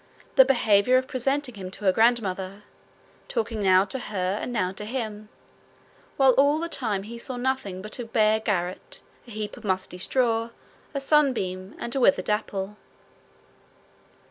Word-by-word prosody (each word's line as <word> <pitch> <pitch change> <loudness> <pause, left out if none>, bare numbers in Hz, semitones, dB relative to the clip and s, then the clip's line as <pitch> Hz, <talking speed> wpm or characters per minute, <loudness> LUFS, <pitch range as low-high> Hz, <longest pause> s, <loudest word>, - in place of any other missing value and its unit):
the 265 - +9
behaviour 245 -2 +4
of 260 0 -1
presenting 270 0 -1
him 190 -3 -7
to 200 +2 -8
her 190 - +6
grandmother, 200 -3 +1 0.6
talking 225 -2 -2
now 190 -1 +5
to 260 +7 -4
her 195 -3 -2
and - - -4
now 195 -6 0
to 195 - -7
him, 215 -2 -5 0.9
while 270 -1 +6
all 285 +2 +5
the 335 +2 -2
time 220 -11 -2
he 235 +3 -8
saw 255 +1 -5
nothing 245 -7 -2
but 215 +4 -8
a 240 - -4
bare 220 -1 +3
garret, 185 -5 -3 0.3
a - - -12
heap 215 -2 -5
of - - -13
musty 185 -2 -2
straw, 230 +1 +1 0.5
a - - +1
sunbeam, 235 -10 +1
and 235 - -5
a - - +1
withered 190 -4 +3
apple. 210 -1 -2
215 Hz, 160 wpm, -25 LUFS, 195-255 Hz, 0.9 s, the